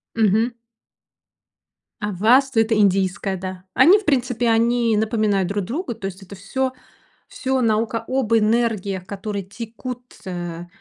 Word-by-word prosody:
Мгм. 225 +2 +2 1.5
А 210 -1 -2
Васту- 240 +6 +3
это 225 0 +2
индийское, 195 -1 +1
да. 185 0 -7
Они, 385 +5 +7
в 415 - -13
принципе, 245 -4 +1
они 230 -1 +2
напоминают 215 -4 +1
друг 200 -1 -2
друга, 285 - -3
то 210 - -8
есть 195 0 -6
это 200 +2 -11
всё 260 +7 -2 0.5
всё 265 0 -2
наука 225 0 0
об 255 -4 0
энергиях, 215 -4 +1
которые 200 -1 -5
текут, 235 +4 -7 0.2
э, 175 -2 -5
220 Hz, 135 wpm, -21 LUFS, 195-240 Hz, 1.5 s, Они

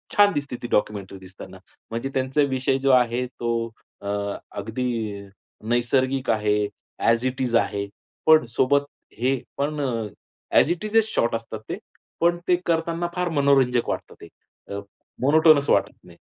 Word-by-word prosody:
छान 205 0 +6
दिसते 140 -3 -3
ती 120 - -4
डॉक्युमेंटरी 100 -2 -1
दिसताना. 95 0 -12 0.3
म्हणजे 115 +4 -3
त्यांचा 130 +2 +1
विषय 130 0 +1
जो 135 - +4
आहे 125 -1 +3
तो 120 -1 -4 0.5
अ, 100 - -7 0.4
अगदी 110 +5 -4 0.8
नैसर्गिक 130 +2 +1
आहे, 105 -1 +1 0.3
ॲज 115 +2 +2
इट 130 0 -2
इज 120 -2 0
आहे, 100 -3 +1 0.4
पण 155 -5 +6
सोबत 140 +2 +3 0.3
हे 130 +3 +2 0.2
पण 150 +2 -1
अ, 115 -5 -1 0.5
ॲज 165 - +5
इट 175 +4 -2
इजच 220 +1 +3
शॉर्ट 115 0 +1
असतात 115 0 -5
ते, - - -3 0.4
पण 170 +1 +3
ते 180 - +5
करताना 170 +1 0
फार 180 -1 0
मनोरंजक 135 -4 +3
वाटतात - - -4
ते. - - -10 0.5
अ, 100 - -3 0.4
मोनोटोनस 155 +1 +5
वाटत - - +3
नाही. - - -16
130 Hz, 150 wpm, -24 LUFS, 115-145 Hz, 0.8 s, छान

